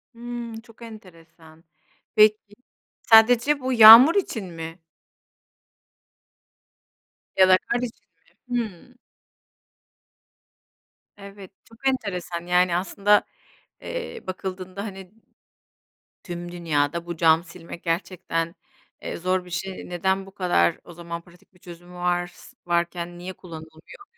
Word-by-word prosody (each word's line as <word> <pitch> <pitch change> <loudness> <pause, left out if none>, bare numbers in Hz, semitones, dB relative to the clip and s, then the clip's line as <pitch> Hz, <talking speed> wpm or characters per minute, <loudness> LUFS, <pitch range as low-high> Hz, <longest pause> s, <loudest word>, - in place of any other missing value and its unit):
Hımm 240 -1 -7
çok 230 0 -21
enteresan. 165 -7 -15 0.5
Peki, 215 -1 +3 0.5
sadece 240 +5 +5
bu 260 0 -2
yağmur 230 +7 +10
için 250 - -2
mi? 165 -1 -8 2.6
Ya 190 -1 +6
da 185 - +7
kar 240 - -3
için 245 -1 -7 0.4
mi? 245 -1 -1
Hımm. 230 +3 -8 2.2
Evet, 200 -1 -12
çok 230 +4 -7
enteresan. 180 -9 -3
Yani, 180 0 +2
aslında, 200 +3 +2 0.6
eee, - - -6
bakıldığında, 185 +1 -6
hani, 190 -3 -9 1.1
tüm 175 -1 -7
dünyada 170 -1 -1
bu 170 -1 -5
cam 165 0 +3
silmek 170 -1 -11
gerçekten, 165 -1 -3 0.5
eee, - - -5
zor 185 +1 -1
bir 180 - -14
şey. 185 +2 -6
Neden 190 +2 -1
bu 195 - -16
kadar 175 - +1
o - - -13
zaman 170 0 -7
pratik 175 +1 -23
bir - - -23
çözüm 175 -1 -13
vars 175 0 -3
varken 175 0 -2
niye 180 +2 -7
kullanılmıyor? 160 - -13
185 Hz, 110 wpm, -24 LUFS, 170-215 Hz, 2.6 s, yağmur